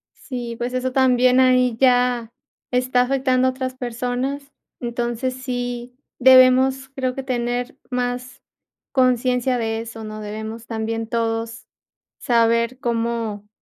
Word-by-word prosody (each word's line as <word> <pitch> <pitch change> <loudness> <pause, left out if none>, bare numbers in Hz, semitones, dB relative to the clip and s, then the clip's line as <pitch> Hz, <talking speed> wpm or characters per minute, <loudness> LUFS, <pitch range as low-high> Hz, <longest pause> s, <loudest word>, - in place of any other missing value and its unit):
Sí, 240 -3 -6
pues, 240 +2 -3
eso 255 0 -1
también 255 -1 +4
ahí 255 -2 +4
ya 245 -3 +3 0.4
está 250 0 +2
afectando 255 0 +2
a - - +2
otras 255 0 -4
personas. 255 +3 -3 0.3
Entonces, 240 +1 -2
sí 245 -1 -4 0.2
debemos, 260 +1 +6
creo 255 -1 -1
que 270 - -4
tener 245 0 -2
más 250 0 -3 0.5
consciencia 250 0 +2
de 225 -1 -2
eso, 225 -1 -8
¿no?, 215 0 -7
debemos 220 +2 -6
también 225 0 -3
todos 230 0 -2 0.5
saber 235 +1 +2
cómo 230 -3 -2
245 Hz, 120 wpm, -21 LUFS, 230-255 Hz, 0.5 s, debemos